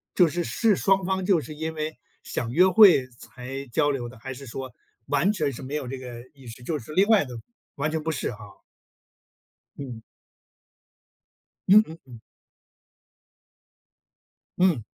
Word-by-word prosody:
就 180 - +6
是， 170 +2 -2
是 220 +2 +2
双 195 -1 +2
方 190 0 -1
就 185 -3 +4
是 155 - -9
因 160 +1 -4
为 155 0 -4 0.3
想 115 - -4
约 180 +8 +5
会 185 -9 +7
才 135 +3 -8
交 145 +1 +2
流 120 -4 -4
的， 125 -2 -14
还 130 +2 -6
是 135 +2 -10
说 130 +2 -6 0.4
完 170 +8 +2
全 155 -9 -1
是 120 - -9
没 135 +3 -5
有 135 -4 -3
这 135 +1 -5
个 125 -2 -8
意 135 -3 -16
识， 115 +2 -10
就 155 +5 -2
是 150 +6 -10
另 195 +4 +4
外 215 -7 +5
的， 130 - -12 0.5
完 145 +2 -1
全 160 0 -2
不 160 - -1
是 - - -3
哈。 105 -2 -13 1.2
嗯。 125 -5 -7 1.7
嗯 210 +2 +8
嗯 160 +1 -9
嗯。 120 -3 -12 2.4
嗯。 175 - +3
145 Hz, 170 characters per minute, -25 LUFS, 125-175 Hz, 2.4 s, 嗯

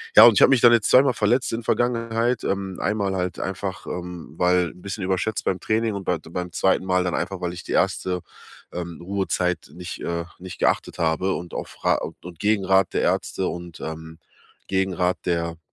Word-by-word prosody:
Ja, 110 - +11
und 120 - +8
ich - - +3
habe - - +8
mich 130 - +5
dann 120 -1 +8
jetzt 110 -3 +3
zweimal 130 0 +6
verletzt 115 +4 +1
in 115 - -1
der 115 - -11
Vergangenheit. 115 0 0
Ähm, 95 -1 -2
einmal 100 -2 0
halt 90 0 -2
einfach, 95 -1 -4
ähm, 90 -3 -6
weil 90 -2 +2
’n 90 - -17
bisschen 100 0 -5
überschätzt 95 +2 -1
beim 95 - 0
Training 110 0 0
und 100 - -5
bei 90 - +1
d 80 - -15
beim 90 0 -4
2. 95 +3 +2
Mal 90 -1 +2
dann 90 - 0
einfach, 90 +1 -3
weil 90 0 -2
ich 90 - -8
die - - -8
1. 90 -1 +1 0.5
ähm, 85 -2 -5
Ruhezeit 90 -2 -1
nicht 90 0 -7
äh, 85 0 -2
nicht 95 0 -9
geachtet - - +1
habe 85 +4 +1
und 85 0 -6
auf - - -7
Ra - - +4 0.2
und 85 -2 -11
Gegenrat 95 -3 +2
der - - +1
Ärzte, 95 - 0
und, 85 -2 -6
ähm, 80 0 -7 0.5
Gegenrat 95 -2 +1
der, 85 -2 -1
95 Hz, 200 wpm, -24 LUFS, 90-105 Hz, 0.5 s, Ja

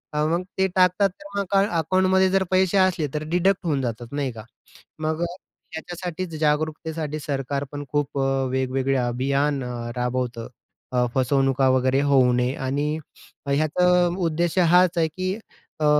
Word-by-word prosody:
हां 150 0 +1
मग 170 +2 0 0.2
ते 190 - +4
टाकतात, 185 +2 +4
तर 200 +2 -18
मग 200 - 0
काय 195 0 +4
अकाउंटमध्ये 185 +3 +3
जर 195 0 +3
पैशे 185 +1 +3
असले 185 -5 +2
तर 150 0 -2
डिडक्ट 180 +2 +1
होऊन 145 -5 0
जातात 120 0 -5
नाही 140 -3 -1
का? 110 -1 -9 0.6
मग 155 +1 -2
अ, - - +2 0.5
याच्यासाठीच, 175 0 -5
जागरूकतेसाठी 155 0 -1
सरकार 140 -1 -3
पण 145 0 -5
खूप 145 -1 -1
अ, 135 0 +1
वेगवेगळे 130 +1 0
अभियान 135 +3 0
अ, 125 0 -5 0.2
राबवतं, 125 -1 -2 0.5
अ, 125 0 +3
फसवणुका 135 0 +2
वगैरे 130 +1 +2
होऊ 130 -2 +5
नये. 125 +1 +1
आणि 145 +3 -1 0.5
ह्याचा 155 +5 +2 0.3
उद्देश 170 0 -1
हाच 180 0 +4
आहे 165 -1 +3
की 185 +4 -3 0.5
अ, - - +2
150 Hz, 155 wpm, -23 LUFS, 135-175 Hz, 0.6 s, होऊ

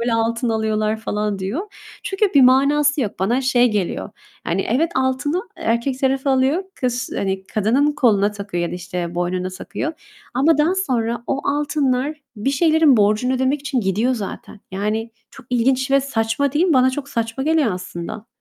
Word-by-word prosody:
böyle, 235 0 0
altın 230 +2 0
alıyorlar?" 220 -1 0
falan 210 -2 -2
diyor. 195 - -3 0.4
Çünkü 390 +1 0
bir 280 - +7
manası 285 +3 +4
yok. 215 -6 -3
Bana 230 +7 +1
şey 250 -2 +3
geliyor, 205 -1 -2 0.4
yani 185 +3 -1
evet, 305 +9 +1
altını 265 +7 0
e - - -10
erkek 235 +3 0
tarafı 270 +1 +1
alıyor, 265 +7 +2
kız, 250 0 -2
hani, 190 -1 -2
kadının 250 +8 +1
koluna 210 -7 +3
takıyor, 200 -4 -4
ya 170 - -3
da - - -5
işte 180 -1 -5
boynuna 180 +1 -1
takıyor, 195 - -5 0.4
ama 285 +5 +3
daha 320 +5 +3
sonra 240 -11 -1
o 275 - -1
altınlar, 285 -1 0 0.2
bir 215 +6 -1
şeylerin 310 -1 +4
borcunu 215 +4 +2
ödemek 265 +2 0
için 280 -3 -1
gidiyor 215 +6 +1
zaten. 205 -1 -7
Yani, 215 +4 -2 0.2
çok 265 - -15
ilginç 260 +2 +1
ve 275 - +5
saçma 260 +1 -1
değil 305 +4 +2
mi? 350 - +3
Bana 260 -1 +4
çok 280 +1 -5
saçma 230 +1 -2
geliyor 310 -7 +2
aslında. 180 +4 -7
250 Hz, 175 wpm, -20 LUFS, 210-275 Hz, 0.4 s, bir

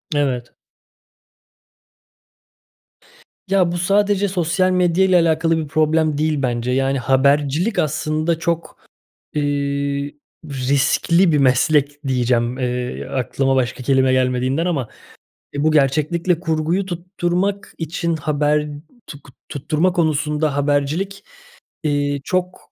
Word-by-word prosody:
Evet. 130 -4 -1 3.0
Ya, 185 -3 +3
bu 175 - -2
sadece 200 +2 +2
sosyal 185 0 +1
medya 180 +1 +2
ile 185 -1 +3
alakalı 165 0 +2
bir 155 -2 -3
problem 155 0 +1
değil 155 -2 0
bence. 120 -1 -1
Yani, 135 +1 +1
habercilik 140 - +2
aslında 155 +2 -1
çok, 170 -1 -3 0.6
eee, 140 0 -1 0.4
riskli 140 +6 +2
bir 150 - +3
meslek 145 +2 +2
diyeceğim, 125 -1 +1
eee, 125 0 -3
aklıma 135 +1 -1
başka 125 0 -1
kelime 130 0 +3
gelmediğinden 130 +4 +1
ama, 140 -11 -1 0.6
eee, 145 +1 -2
bu 155 - +3
gerçeklikle 155 +4 +1
kurguyu 165 +3 -1
tutturmak 180 +2 -2
için 165 +1 -2
haber 150 0 0 0.4
tuk 145 -2 -11 0.2
tutturma 155 +5 0
konusunda 150 -3 0
habercilik, 145 +8 -1 0.6
eee, 145 -1 0
çok 180 +2 -3
150 Hz, 105 wpm, -20 LUFS, 140-170 Hz, 3.0 s, Ya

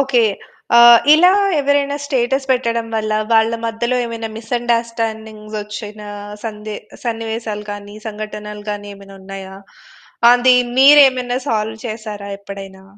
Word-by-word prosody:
Okay. 260 -4 +2 0.5
ఆ! - - +8 0.4
ఇలా 355 +4 +6 0.3
ఎవరైనా 285 0 +1
స్టేటస్ 265 -1 -1
పెట్టడం 235 -2 -1
వల్ల 215 0 -2 0.2
వాళ్ళ 225 0 +4 0.2
మధ్యలో 235 +2 -1
ఏమైనా 230 -1 -5
మిస్‌అండర్‌స్టాండింగ్స్ 225 -2 -3
వచ్చిన 210 0 -8 0.4
సందే 215 -1 -6 0.3
సన్నివేశాలు 225 -2 -4
కాని 205 0 -9
సంఘటనలు 210 -1 -7
గాని 205 0 -6
ఏమైనున్నాయా? 195 -1 -11 0.8
అది 250 +1 +5 0.2
మీరేమైనా 260 -3 +6
సాల్వ్ 220 0 -2
చేసారా? 215 -2 -7
ఎప్పుడైనా? 195 -1 -10
225 Hz, 105 wpm, -18 LUFS, 210-245 Hz, 0.8 s, ఆ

